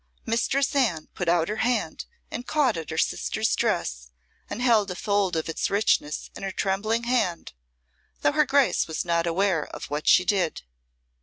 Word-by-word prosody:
Mistress 250 Hz, +4 st, +1 dB
Anne 195 Hz, -, +1 dB
put 180 Hz, -, -4 dB
out 170 Hz, -1 st, +3 dB
her 215 Hz, -, -3 dB
hand 245 Hz, +2 st, -1 dB, 0.3 s
and 245 Hz, -, -6 dB
caught 295 Hz, -8 st, +2 dB
at 165 Hz, -2 st, -6 dB
her 160 Hz, -, -4 dB
sister's -, -, 0 dB
dress -, -, -1 dB, 0.4 s
and -, -, -5 dB
held 230 Hz, -5 st, +3 dB
a 180 Hz, -, -4 dB
fold 200 Hz, -2 st, 0 dB
of 160 Hz, -, -1 dB
its 165 Hz, -, -2 dB
richness 195 Hz, -7 st, 0 dB
in -, -, -8 dB
her 195 Hz, -, -3 dB
trembling 215 Hz, +5 st, -1 dB
hand, 235 Hz, -, -1 dB, 0.7 s
though -, -, +3 dB
her 300 Hz, 0 st, +2 dB
Grace 275 Hz, 0 st, +3 dB
was 160 Hz, +1 st, -3 dB
not 170 Hz, 0 st, +1 dB
aware 175 Hz, -1 st, +1 dB
of -, -, -9 dB
what 150 Hz, +1 st, -3 dB
she 180 Hz, -, +6 dB
did. 180 Hz, -, 0 dB
195 Hz, 175 wpm, -25 LUFS, 165-235 Hz, 0.7 s, she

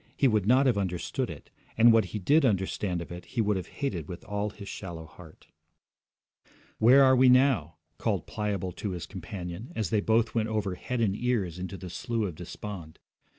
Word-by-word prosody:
He 140 Hz, -, +4 dB
would 105 Hz, -5 st, +1 dB
not 130 Hz, +4 st, +5 dB
have 120 Hz, -6 st, +3 dB
understood 90 Hz, -3 st, -2 dB
it, -, -, -10 dB, 0.3 s
and 115 Hz, +1 st, +7 dB
what 115 Hz, -2 st, +4 dB
he 100 Hz, -, -5 dB
did 145 Hz, -, +3 dB
understand 95 Hz, -5 st, 0 dB
of -, -, -13 dB
it 90 Hz, 0 st, -7 dB
he 120 Hz, -, -6 dB
would 105 Hz, -2 st, +2 dB
have 95 Hz, -, -4 dB
hated 95 Hz, -, -4 dB
with 90 Hz, -, -8 dB
all 105 Hz, +1 st, -2 dB
his 100 Hz, -1 st, -11 dB
shallow 85 Hz, -6 st, -7 dB
heart. 80 Hz, 0 st, -15 dB, 1.3 s
'Where 130 Hz, +5 st, +7 dB
are 130 Hz, 0 st, +6 dB
we 130 Hz, 0 st, +6 dB
now?' 125 Hz, -, +4 dB, 0.2 s
called -, -, -1 dB
Pliable 100 Hz, -3 st, -3 dB
to 100 Hz, +2 st, -4 dB
his 85 Hz, -, -5 dB
companion, 90 Hz, -, -7 dB
as 105 Hz, -6 st, -2 dB
they 105 Hz, -, +2 dB
both 110 Hz, +1 st, +2 dB
went 110 Hz, -1 st, 0 dB
over 105 Hz, -3 st, -1 dB
head 125 Hz, +6 st, -3 dB
and 100 Hz, -4 st, +2 dB
ears 105 Hz, -8 st, -1 dB
into 95 Hz, +1 st, -5 dB
the 90 Hz, -2 st, -8 dB
Slough 115 Hz, -3 st, -2 dB
of -, -, -8 dB
Despond. 90 Hz, 0 st, -8 dB
105 Hz, 195 wpm, -28 LUFS, 90-115 Hz, 1.3 s, and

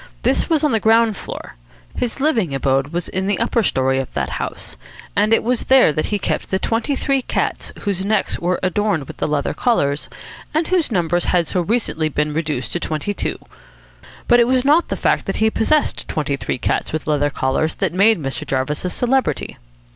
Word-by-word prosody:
This -, -, +1 dB
was 315 Hz, -3 st, +2 dB
on 300 Hz, -, +3 dB
the 225 Hz, -, +2 dB
ground 225 Hz, 0 st, +4 dB
floor. -, -, -8 dB, 0.4 s
His 245 Hz, +2 st, -2 dB
living 225 Hz, -, +1 dB
abode 135 Hz, 0 st, +1 dB
was 170 Hz, +3 st, -3 dB
in 190 Hz, +1 st, -2 dB
the 205 Hz, -, +1 dB
upper 230 Hz, 0 st, +1 dB
story 130 Hz, -8 st, +1 dB
of 135 Hz, -, -4 dB
that -, -, -1 dB
house, -, -, -5 dB, 0.4 s
and 210 Hz, +2 st, +2 dB
it 225 Hz, -, +4 dB
was 245 Hz, 0 st, 0 dB
there 260 Hz, -, +5 dB
that 155 Hz, -, -1 dB
he 210 Hz, -, 0 dB
kept 200 Hz, -, -2 dB
the 190 Hz, -, +1 dB
twenty 230 Hz, +8 st, -1 dB
three 275 Hz, 0 st, 0 dB
cats -, -, -2 dB
whose 195 Hz, -3 st, -2 dB
necks 210 Hz, 0 st, 0 dB
were 180 Hz, +1 st, 0 dB
adorned 185 Hz, -3 st, 0 dB
with -, -, -11 dB
leather 150 Hz, -1 st, 0 dB
collars, 145 Hz, -, 0 dB, 0.5 s
and 315 Hz, +1 st, +1 dB
whose 360 Hz, -3 st, +2 dB
numbers 175 Hz, -3 st, +1 dB
had 175 Hz, -2 st, +2 dB
so 180 Hz, -, -1 dB
recently 175 Hz, -6 st, 0 dB
been 150 Hz, +1 st, -1 dB
reduced 155 Hz, -5 st, -2 dB
to 175 Hz, -, -1 dB
twenty 160 Hz, +5 st, -2 dB
two. -, -, -3 dB, 0.9 s
But 240 Hz, -, +6 dB
it 235 Hz, -, +4 dB
was 255 Hz, 0 st, +2 dB
not 305 Hz, +4 st, +4 dB
the -, -, -3 dB
fact -, -, +1 dB
that -, -, -1 dB
he 220 Hz, 0 st, +2 dB
possessed 295 Hz, +8 st, +1 dB
twenty 145 Hz, -2 st, -1 dB
three 135 Hz, -, -3 dB
cats -, -, -1 dB
with 155 Hz, -1 st, -3 dB
leather 145 Hz, -1 st, +1 dB
collars 135 Hz, +3 st, -1 dB
that -, -, -1 dB
made 200 Hz, +2 st, +4 dB
Mr. 135 Hz, -3 st, -4 dB
Jarvis 135 Hz, +2 st, -2 dB
a 180 Hz, -, -1 dB
celebrity. 255 Hz, +7 st, 0 dB
190 Hz, 200 wpm, -20 LUFS, 150-235 Hz, 0.9 s, But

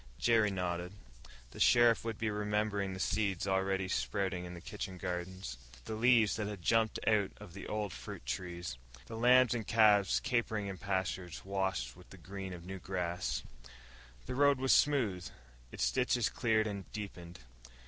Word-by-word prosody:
Jerry 115 Hz, -3 st, +3 dB
nodded. 90 Hz, -1 st, -3 dB, 0.6 s
The -, -, -11 dB
sheriff 120 Hz, -1 st, +5 dB
would 115 Hz, -2 st, -3 dB
be 110 Hz, -1 st, -1 dB
remembering 105 Hz, -1 st, -1 dB
the -, -, -7 dB
seeds 100 Hz, -3 st, 0 dB
already 95 Hz, 0 st, 0 dB
sprouting 95 Hz, -2 st, -1 dB
in 90 Hz, 0 st, -7 dB
the -, -, -8 dB
kitchen 95 Hz, +1 st, -6 dB
gardens. 90 Hz, -5 st, -5 dB, 0.3 s
The 110 Hz, -, -4 dB
leaves 115 Hz, -1 st, +4 dB
that 105 Hz, -2 st, -2 dB
had 100 Hz, -4 st, -6 dB
jumped 115 Hz, +2 st, +2 dB
out 105 Hz, -3 st, +3 dB
on 105 Hz, -4 st, -11 dB
the 100 Hz, +3 st, -8 dB
old 105 Hz, -2 st, -2 dB
fruit -, -, -8 dB
trees. 85 Hz, +1 st, -4 dB, 0.3 s
The 115 Hz, -, -8 dB
lambs 125 Hz, +1 st, +5 dB
and 115 Hz, -4 st, -3 dB
calves 105 Hz, -3 st, +5 dB
capering 115 Hz, -5 st, -1 dB
in 95 Hz, -2 st, -5 dB
pastures 95 Hz, -3 st, -3 dB
washed 95 Hz, -11 st, -2 dB
with -, -, -16 dB
the -, -, -12 dB
green 95 Hz, -1 st, -7 dB
of 90 Hz, -1 st, -8 dB
new 95 Hz, +1 st, -6 dB
grass. 85 Hz, -9 st, -2 dB, 0.8 s
The 130 Hz, -, -4 dB
road 140 Hz, +1 st, +4 dB
was 130 Hz, 0 st, +3 dB
smooth, 110 Hz, -12 st, +2 dB, 0.4 s
its -, -, 0 dB
ditches 125 Hz, -2 st, +1 dB
cleared 110 Hz, -2 st, +1 dB
and 100 Hz, -3 st, -5 dB
deepened. 90 Hz, -5 st, -7 dB
100 Hz, 165 wpm, -33 LUFS, 90-110 Hz, 0.8 s, sheriff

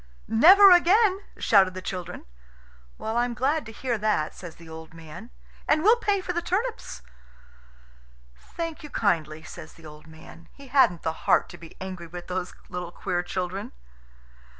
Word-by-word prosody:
"Never 375 Hz, -, +7 dB
again!" 380 Hz, +3 st, +4 dB, 0.2 s
shouted 190 Hz, -3 st, +3 dB
the -, -, -4 dB
children. 180 Hz, -2 st, -6 dB, 0.7 s
"I'm 240 Hz, +2 st, -1 dB
glad 280 Hz, +2 st, 0 dB
to -, -, -8 dB
hear 235 Hz, +1 st, -3 dB
that," 205 Hz, -8 st, 0 dB
says 175 Hz, -3 st, -10 dB
the 165 Hz, -, -15 dB
old 160 Hz, 0 st, -11 dB
man. 165 Hz, +8 st, -11 dB, 0.4 s
"And 310 Hz, +1 st, +2 dB
we'll 445 Hz, +4 st, +6 dB
pay 410 Hz, -4 st, 0 dB
for 360 Hz, -, -4 dB
the 345 Hz, -, -1 dB
turnips." 390 Hz, -, -3 dB, 1.3 s
"Thank 330 Hz, -, -7 dB
you 300 Hz, -, -10 dB
kindly," 160 Hz, -, -1 dB
says 160 Hz, -2 st, -11 dB
the 165 Hz, -, -17 dB
old 150 Hz, 0 st, -13 dB
man. 160 Hz, +1 st, -15 dB
He 280 Hz, -2 st, -15 dB
hadn't 250 Hz, -, +3 dB
the 160 Hz, -, -1 dB, 0.2 s
heart -, -, +4 dB
to -, -, -11 dB
be 165 Hz, -1 st, -14 dB
angry 185 Hz, -2 st, -7 dB
with 175 Hz, +1 st, -9 dB
those 180 Hz, 0 st, -4 dB
little 180 Hz, -1 st, -6 dB
queer 175 Hz, -1 st, -2 dB
children. 185 Hz, +2 st, -5 dB
195 Hz, 160 wpm, -25 LUFS, -, 1.3 s, Never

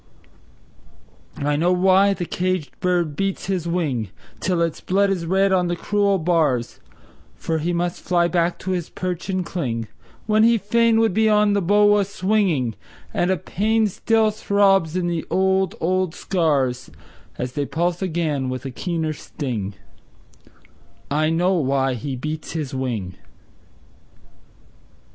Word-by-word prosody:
I 145 Hz, +1 st, 0 dB
know 175 Hz, +4 st, +2 dB
why 190 Hz, +2 st, +4 dB
the 175 Hz, -, -4 dB
caged 185 Hz, -3 st, -2 dB
bird 175 Hz, -4 st, 0 dB
beats 195 Hz, +3 st, -2 dB
his 180 Hz, -3 st, -2 dB
wing 145 Hz, -, -1 dB, 0.3 s
Till 180 Hz, 0 st, 0 dB
its 165 Hz, -2 st, -3 dB
blood 195 Hz, +1 st, +2 dB
is 175 Hz, -4 st, -2 dB
red 195 Hz, +2 st, +2 dB
on 180 Hz, -2 st, +2 dB
the 175 Hz, -, -1 dB
cruel 200 Hz, +2 st, +1 dB
bars; 160 Hz, -8 st, 0 dB, 0.6 s
For 160 Hz, -1 st, -2 dB
he 165 Hz, +3 st, -1 dB
must 175 Hz, 0 st, -2 dB
fly 175 Hz, -1 st, +2 dB
back 175 Hz, 0 st, 0 dB
to 185 Hz, -, -4 dB
his 175 Hz, -3 st, -2 dB
perch 180 Hz, 0 st, -4 dB
and 185 Hz, -2 st, -1 dB
cling 115 Hz, -, -3 dB, 0.4 s
When 215 Hz, 0 st, +3 dB
he 230 Hz, +1 st, +5 dB
fain 225 Hz, +2 st, +2 dB
would 225 Hz, -4 st, +2 dB
be 220 Hz, +2 st, +3 dB
on 210 Hz, -1 st, +4 dB
the 200 Hz, -, +1 dB
bough 205 Hz, +3 st, +4 dB
a -, -, +3 dB
swing; 185 Hz, -, 0 dB, 0.4 s
And 175 Hz, -, +1 dB
a 190 Hz, -, +2 dB
pain 220 Hz, +7 st, 0 dB
still 220 Hz, +2 st, +1 dB
throbs 195 Hz, -5 st, +2 dB
in 180 Hz, -1 st, 0 dB
the 170 Hz, -2 st, -1 dB
old, 190 Hz, -1 st, +1 dB
old 185 Hz, 0 st, 0 dB
scars 140 Hz, -9 st, 0 dB, 0.5 s
And 125 Hz, -, -2 dB
they 140 Hz, +2 st, -3 dB
pulse 175 Hz, +2 st, -1 dB
again 155 Hz, -7 st, -1 dB
with 130 Hz, +1 st, -5 dB
a 135 Hz, -, -4 dB
keener 160 Hz, +2 st, -2 dB
sting 115 Hz, -10 st, -5 dB, 1.4 s
I 155 Hz, +2 st, +2 dB
know 175 Hz, +3 st, +2 dB
why 135 Hz, -5 st, +1 dB
he 130 Hz, +3 st, -4 dB
beats 155 Hz, +5 st, -5 dB
his 155 Hz, -5 st, -4 dB
wing! 115 Hz, -9 st, -3 dB
175 Hz, 150 wpm, -22 LUFS, 150-195 Hz, 1.4 s, he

